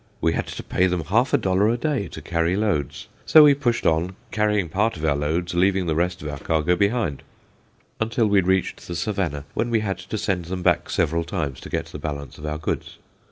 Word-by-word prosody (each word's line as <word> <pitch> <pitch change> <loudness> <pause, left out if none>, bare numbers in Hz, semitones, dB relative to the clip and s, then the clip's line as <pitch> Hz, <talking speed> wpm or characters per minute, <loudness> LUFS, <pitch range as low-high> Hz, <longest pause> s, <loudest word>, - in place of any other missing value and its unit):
We 80 - +1
had - - -2
to - - -6
pay 95 - +1
them 90 -2 -1
half 115 - +2
a - - +5
dollar 95 +3 +2
a 120 - +1
day 140 -5 -1
to - - -10
carry 85 +1 0
loads. 75 -9 -1 0.2
So 155 - +8
we 145 -1 +7
pushed 125 -4 -1
on, 85 +4 +1 0.2
carrying 105 -3 +1
part 100 +5 0
of 80 - -3
our 75 -2 +2
loads, 80 +5 -1
leaving 95 +1 +2
the 80 - 0
rest 90 +3 -1
of - - -4
our 75 -1 -5
cargo 80 +3 +1
behind, 100 - 0 0.8
until 115 +1 +1
we 100 -2 +4
reached 95 +1 0
the 85 - -5
Savannah, 85 -6 -2
when 120 - -1
we 115 -2 +2
had 95 -3 -2
to 95 +3 -5
send 95 -4 -1
them 90 +1 -4
back - - +2
several 85 +2 +1
times 75 -7 -3
to - - -10
get 80 0 -2
the 80 -2 -9
balance 70 -1 -6
of 75 - -6
our 75 0 -2
goods. 80 - -4
90 Hz, 225 wpm, -23 LUFS, 80-105 Hz, 0.8 s, So